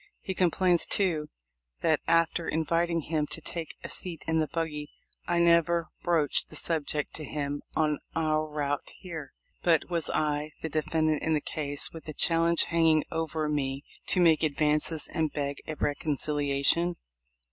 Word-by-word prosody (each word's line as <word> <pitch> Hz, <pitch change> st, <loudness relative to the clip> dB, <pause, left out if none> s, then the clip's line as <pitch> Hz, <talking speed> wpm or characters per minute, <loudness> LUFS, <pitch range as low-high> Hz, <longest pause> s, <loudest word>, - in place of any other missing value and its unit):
He 190 Hz, -, -4 dB
complains, 180 Hz, -1 st, +3 dB
too, 160 Hz, -7 st, 0 dB, 0.5 s
that, -, -, +3 dB
after 165 Hz, 0 st, +2 dB
inviting 165 Hz, +1 st, +1 dB
him 150 Hz, -1 st, -1 dB
to -, -, -3 dB
take 165 Hz, 0 st, -6 dB
a -, -, -6 dB
seat 170 Hz, -4 st, -2 dB
in 160 Hz, 0 st, +2 dB
the 155 Hz, -, +1 dB
buggy 150 Hz, -3 st, -3 dB, 0.4 s
I 175 Hz, -, +1 dB
never 170 Hz, -1 st, +3 dB
broached 160 Hz, -5 st, +2 dB
the -, -, -12 dB
subject 150 Hz, -2 st, -1 dB
to 155 Hz, -, -6 dB
him 145 Hz, 0 st, -3 dB
on 150 Hz, -2 st, +1 dB, 0.2 s
our 155 Hz, -1 st, +1 dB
route 145 Hz, -2 st, -3 dB
here. 165 Hz, -6 st, -7 dB, 0.3 s
But 170 Hz, 0 st, +2 dB
was 170 Hz, -2 st, 0 dB
I, 150 Hz, 0 st, -1 dB
the 160 Hz, -, -2 dB
defendant 155 Hz, 0 st, 0 dB
in 160 Hz, -, +1 dB
the -, -, +2 dB
case, 145 Hz, -1 st, -3 dB
with 165 Hz, -1 st, -10 dB
a 155 Hz, -, -5 dB
challenge 165 Hz, +2 st, +3 dB
hanging 165 Hz, -2 st, +3 dB
over 160 Hz, -1 st, -1 dB
me, 140 Hz, -2 st, -1 dB, 0.2 s
to 185 Hz, -, +3 dB
make 165 Hz, -3 st, +5 dB
advances, 150 Hz, +1 st, +2 dB
and 160 Hz, -3 st, -1 dB
beg 140 Hz, -1 st, -3 dB
a 155 Hz, -, -4 dB
reconciliation 145 Hz, +3 st, +1 dB
155 Hz, 160 wpm, -28 LUFS, 150-165 Hz, 0.5 s, make